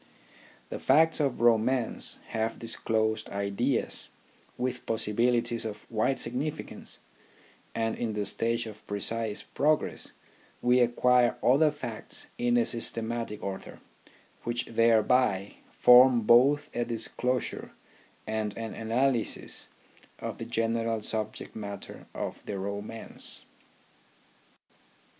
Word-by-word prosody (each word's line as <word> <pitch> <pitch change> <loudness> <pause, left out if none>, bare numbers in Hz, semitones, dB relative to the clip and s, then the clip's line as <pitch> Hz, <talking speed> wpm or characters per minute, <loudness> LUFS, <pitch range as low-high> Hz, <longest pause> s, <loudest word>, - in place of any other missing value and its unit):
The - - -5
facts 160 +5 +4
of 140 -6 0
romance 120 +1 +2
have 110 0 -1
disclosed 110 -1 -1
ideas 100 +6 -1 0.5
with 125 0 -3
possibilities 115 +2 +1
of 105 -2 -6
wide 115 +4 +1
significance, 130 +6 -4 0.7
and 115 -1 0
in 115 -2 -2
the 105 -1 -1
stage 115 +3 +1
of 105 -1 -11
precise 105 +1 -3
progress 150 +2 0 0.5
we 125 +1 +4
acquire 125 0 +4
other 145 +5 +5
facts 125 -7 -6
in 120 0 +3
a 120 - +3
systematic 115 -1 -1
order, 95 -1 -6 0.6
which 120 +1 -2
thereby 115 -3 +2
form 125 0 +7
both 130 +7 +4
a 120 - +1
disclosure 125 +1 -2 0.6
and 110 -1 -2
an 115 -1 -4
analysis 120 +2 -1 0.5
of - - -6
the 115 - -4
general 115 -1 0
subject 110 0 -4
matter 100 -2 -7
of - - -4
the 100 - -3
romance. 100 +3 -6
115 Hz, 105 wpm, -29 LUFS, 110-125 Hz, 0.7 s, form